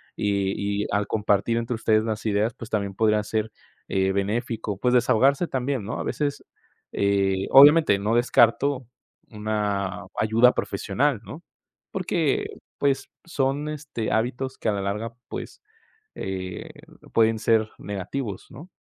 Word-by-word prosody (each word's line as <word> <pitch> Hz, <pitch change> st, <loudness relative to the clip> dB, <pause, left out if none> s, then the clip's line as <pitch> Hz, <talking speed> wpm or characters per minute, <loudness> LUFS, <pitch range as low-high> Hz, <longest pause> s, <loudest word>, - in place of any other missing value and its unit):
y 100 Hz, 0 st, -1 dB
y -, -, -4 dB
al 100 Hz, 0 st, +1 dB
compartir 110 Hz, +2 st, +1 dB
entre 115 Hz, +1 st, -2 dB
ustedes 110 Hz, -1 st, +2 dB
las 110 Hz, -1 st, -3 dB
ideas, 110 Hz, +2 st, +1 dB
pues, 115 Hz, -, -10 dB
también 100 Hz, -2 st, -2 dB
podría 105 Hz, 0 st, +2 dB
ser, 110 Hz, +1 st, -2 dB, 0.4 s
eh, 95 Hz, 0 st, +1 dB
benéfico, 105 Hz, +1 st, -2 dB
pues, 125 Hz, +4 st, +1 dB
desahogarse 130 Hz, +5 st, +3 dB
también, 130 Hz, -3 st, -2 dB
¿no?, 110 Hz, +4 st, -4 dB
a -, -, -2 dB
veces, 145 Hz, -1 st, -2 dB, 0.5 s
eh, 100 Hz, -1 st, +1 dB
obviamente 145 Hz, -4 st, +8 dB
no 105 Hz, +3 st, 0 dB
descarto 125 Hz, +3 st, +3 dB, 0.4 s
una 105 Hz, -2 st, -2 dB
ayuda 115 Hz, +4 st, +4 dB
profesional, 115 Hz, +6 st, -1 dB
¿no?, 155 Hz, -, -9 dB, 0.5 s
porque, 175 Hz, -5 st, 0 dB, 0.3 s
pues, 140 Hz, -1 st, 0 dB, 0.2 s
son, 145 Hz, -2 st, -1 dB
este, 145 Hz, -7 st, -4 dB
hábitos 130 Hz, +3 st, -1 dB
que -, -, -1 dB
a -, -, +3 dB
la 100 Hz, -1 st, -2 dB
larga, 105 Hz, +4 st, -3 dB
pues, -, -, -7 dB, 0.5 s
eh, 95 Hz, -1 st, -5 dB, 0.4 s
pueden 110 Hz, -1 st, +3 dB
ser 110 Hz, -1 st, +2 dB
negativos, 100 Hz, +2 st, -5 dB
¿no? 145 Hz, +8 st, -11 dB
110 Hz, 135 wpm, -24 LUFS, 100-130 Hz, 0.5 s, obviamente